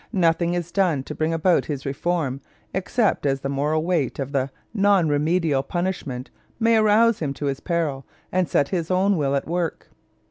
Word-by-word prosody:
Nothing 170 Hz, -1 st, +2 dB
is 175 Hz, -1 st, -3 dB
done 175 Hz, -9 st, +1 dB
to 150 Hz, -, -7 dB
bring 155 Hz, +1 st, -1 dB
about 165 Hz, +2 st, +2 dB
his 140 Hz, -3 st, -5 dB
reform 140 Hz, -1 st, -1 dB, 0.3 s
except 195 Hz, +4 st, 0 dB
as 135 Hz, 0 st, 0 dB
the 135 Hz, -, -3 dB
moral 150 Hz, +3 st, 0 dB
weight 165 Hz, -7 st, 0 dB
of 135 Hz, -1 st, -4 dB
the 135 Hz, -1 st, 0 dB, 0.2 s
non 200 Hz, -5 st, +3 dB
remedial 150 Hz, -1 st, +1 dB
punishment 160 Hz, -6 st, -3 dB, 0.3 s
may 230 Hz, 0 st, +4 dB
arouse 220 Hz, +1 st, +4 dB
him 140 Hz, -3 st, -2 dB
to 145 Hz, -, -4 dB
his 135 Hz, -1 st, -1 dB
peril 155 Hz, -5 st, -1 dB, 0.3 s
and 185 Hz, -2 st, +1 dB
set 140 Hz, -, +2 dB
his 170 Hz, -4 st, -2 dB
own 190 Hz, +2 st, +3 dB
will 140 Hz, -4 st, 0 dB
at 140 Hz, -, -1 dB
work. 170 Hz, -1 st, -3 dB
165 Hz, 180 wpm, -23 LUFS, 140-185 Hz, 0.3 s, may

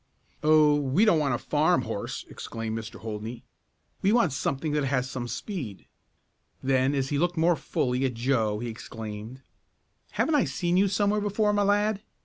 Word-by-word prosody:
"Oh, 155 Hz, -1 st, +5 dB
we 145 Hz, +10 st, +2 dB
don't 170 Hz, -7 st, +4 dB
want 140 Hz, -4 st, +1 dB
a -, -, -1 dB
farm 150 Hz, +2 st, +2 dB
horse!" 110 Hz, -3 st, -4 dB
exclaimed 115 Hz, -1 st, -5 dB
Mr. 110 Hz, -1 st, -7 dB
Holdney. 110 Hz, +2 st, -6 dB, 0.6 s
"We 195 Hz, -, +3 dB
want 225 Hz, -, +3 dB
something 140 Hz, +2 st, -1 dB
that 150 Hz, -1 st, +1 dB
has 130 Hz, -1 st, 0 dB
some 125 Hz, -1 st, -4 dB
speed." 130 Hz, -, -5 dB, 0.8 s
Then, 130 Hz, +1 st, +2 dB
as 135 Hz, -1 st, -1 dB
he 145 Hz, -, 0 dB
looked 175 Hz, +1 st, 0 dB
more 170 Hz, +2 st, +4 dB
fully 125 Hz, -4 st, -1 dB
at 125 Hz, -3 st, -2 dB
Joe 115 Hz, -3 st, +1 dB
he 120 Hz, +3 st, -4 dB
exclaimed: 110 Hz, +2 st, -7 dB, 0.7 s
"Haven't 320 Hz, -, +1 dB
I 290 Hz, -, +4 dB
seen 175 Hz, -1 st, -1 dB
you 195 Hz, +2 st, +4 dB
somewhere 205 Hz, +2 st, +1 dB
before, 210 Hz, +1 st, +1 dB
my 205 Hz, -, +2 dB
lad? 205 Hz, +1 st, +2 dB
140 Hz, 170 wpm, -27 LUFS, 120-180 Hz, 0.8 s, Oh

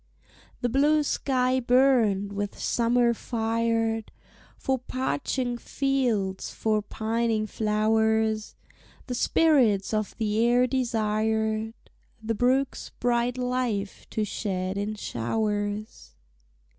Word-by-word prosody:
The 245 Hz, -, +1 dB
blue 295 Hz, +5 st, +3 dB
sky 260 Hz, -2 st, +1 dB
burned, 240 Hz, -6 st, +3 dB
with 205 Hz, 0 st, -4 dB
summer 235 Hz, 0 st, +2 dB
fired; 225 Hz, -1 st, -1 dB, 0.5 s
For 265 Hz, -2 st, -1 dB
parching 255 Hz, -1 st, -2 dB
fields, 240 Hz, -10 st, -1 dB
for 215 Hz, -1 st, 0 dB
pining 220 Hz, +1 st, -1 dB
flowers, 220 Hz, 0 st, +1 dB, 0.5 s
The 250 Hz, -, -4 dB
spirits 245 Hz, -8 st, +3 dB
of 215 Hz, -2 st, -2 dB
the 220 Hz, 0 st, +1 dB
air 245 Hz, +1 st, +4 dB
desired 220 Hz, -3 st, 0 dB, 0.4 s
The 225 Hz, 0 st, -2 dB
brook's 255 Hz, +4 st, 0 dB
bright 245 Hz, +1 st, +1 dB
life 250 Hz, -5 st, -2 dB
to 215 Hz, -, -1 dB
shed 190 Hz, -2 st, -3 dB
in 205 Hz, +2 st, -2 dB
showers. 205 Hz, -, -3 dB
225 Hz, 95 wpm, -26 LUFS, 215-250 Hz, 0.5 s, air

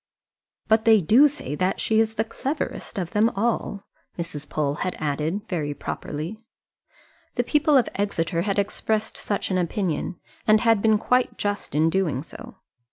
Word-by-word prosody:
"But 220 Hz, 0 st, +3 dB
they 220 Hz, -1 st, +7 dB
do 230 Hz, -, +6 dB
say 290 Hz, -, -6 dB
that 185 Hz, +5 st, 0 dB
she 220 Hz, 0 st, +2 dB
is 220 Hz, 0 st, +1 dB
the 220 Hz, -, +1 dB
cleverest 270 Hz, +4 st, -4 dB
of 175 Hz, -3 st, -3 dB
them 220 Hz, +1 st, +3 dB
all," 205 Hz, -2 st, -1 dB, 0.3 s
Mrs. 165 Hz, -4 st, -6 dB
Pole 145 Hz, -2 st, 0 dB
had 185 Hz, -, -1 dB
added, 155 Hz, +6 st, -1 dB
very 150 Hz, -5 st, -2 dB
properly. 160 Hz, +11 st, -5 dB, 1.0 s
The -, -, +1 dB
people 300 Hz, -1 st, +3 dB
of 250 Hz, -, +3 dB
Exeter 170 Hz, -4 st, -1 dB
had 200 Hz, +2 st, -1 dB
expressed 215 Hz, +2 st, -1 dB
such 205 Hz, -1 st, -2 dB
an 185 Hz, -, +2 dB
opinion, 180 Hz, 0 st, -2 dB, 0.3 s
and 215 Hz, 0 st, +6 dB
had 225 Hz, -3 st, +4 dB
been 220 Hz, 0 st, +4 dB
quite 250 Hz, +4 st, +1 dB
just 205 Hz, -8 st, -3 dB
in 160 Hz, +2 st, +3 dB
doing 160 Hz, -8 st, 0 dB
so. -, -, -11 dB
200 Hz, 165 wpm, -24 LUFS, 165-220 Hz, 1.0 s, they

